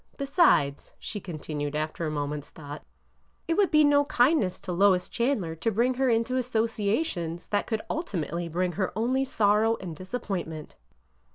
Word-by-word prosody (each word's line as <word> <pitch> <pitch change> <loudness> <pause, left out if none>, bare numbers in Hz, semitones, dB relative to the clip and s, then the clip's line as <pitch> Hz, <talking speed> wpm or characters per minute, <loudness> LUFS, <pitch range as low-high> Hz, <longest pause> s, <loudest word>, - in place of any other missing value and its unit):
Besides," 275 - +2
she 210 - -6
continued 150 -4 -5
after 155 +2 -2
a - - -1
moment's 145 -1 -3
thought, 145 -1 -9 0.7
it 330 - +2
would 395 +2 +3
be 305 -1 +5
no 290 0 +4
kindness 245 - +2
to 185 - -5
Lois 185 0 +3
Chandler 235 -9 -1
to 225 - 0
bring 235 +4 +2
her 260 +1 +1
into 230 +2 +1
associations 220 - -1
that 205 -1 0
could 220 -2 -2
ulti 210 - -2
mately 170 +1 -4
bring 180 +2 0
her 185 +1 -2
only 255 +4 +1
sorrow 220 -2 +2
and 175 -4 -6
disappointment." 185 -5 -5
205 Hz, 160 wpm, -27 LUFS, 165-250 Hz, 0.7 s, be